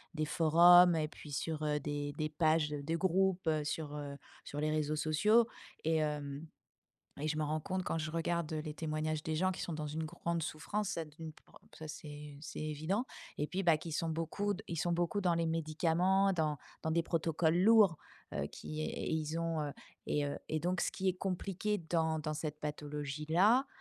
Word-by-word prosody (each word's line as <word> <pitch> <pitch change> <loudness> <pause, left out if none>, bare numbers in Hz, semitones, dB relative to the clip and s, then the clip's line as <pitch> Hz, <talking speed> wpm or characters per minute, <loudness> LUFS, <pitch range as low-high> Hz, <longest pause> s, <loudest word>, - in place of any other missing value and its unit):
des 155 -1 0
forums 170 +3 +7
et 155 -1 +1
puis 150 -1 -12
sur, 155 +2 -2
heu, 150 -1 +1
des 145 0 -3
des 155 -1 -1
pages 155 0 +2
de 150 +2 -2
groupes 185 0 +2
sur, 150 -1 -3
heu, 145 -1 -5 0.3
sur 145 - -5
les 155 +1 +1
réseaux 155 0 0
sociaux 210 +10 +4 0.4
et 160 0 +2
hem 150 0 -2 0.7
et 150 - -1
je 155 0 0
me 155 - 0
rends 155 +1 0
compte 185 +4 -2
quand 165 - -1
je 155 0 -3
regarde 165 -1 -1
les 155 -1 -3
témoignages 155 0 -2
des 160 - -1
gens 185 +4 +2
qui - - -7
sont 170 - -3
dans 155 -1 -3
une 160 +2 -3
grande 170 +2 -2
souffrance. 195 +7 -2
Ça 165 - -2
d'une 155 +1 -9
prend - - -19 0.2
ça 155 - -8
c'est 150 -1 -8
c'est 150 - -7
évident 155 - -1 0.3
et 150 - -1
puis 190 +1 -2
bah, 165 -3 +6
qui 165 - -7
sont 165 +2 -1
beaucoup 165 +6 -1
ils 170 - -3
sont 175 +2 0
beaucoup 175 +4 0
dans 180 -3 +2
les 165 0 +1
médicaments 165 +4 +2
dans 155 -5 0 0.3
dans 160 - +1
des 170 +1 +3
protocoles 165 0 +1
lourds, 200 -4 +6 0.4
heu, - - -1
qui 155 0 -7
et - - -3
ils 160 0 -1
ont, 165 -1 -1
heu 145 -1 -3 0.3
et 145 -1 +1
heu 140 - -3
et 155 - -1
donc 180 +2 0
ce - - 0
qui 190 - -1
est 185 - +2
compliqué 195 +2 -2
dans 160 -1 0
dans 155 0 -2
cette 150 -1 -4
pathologie 150 0 -4
là, 215 - +5
160 Hz, 200 wpm, -34 LUFS, 150-175 Hz, 0.7 s, forums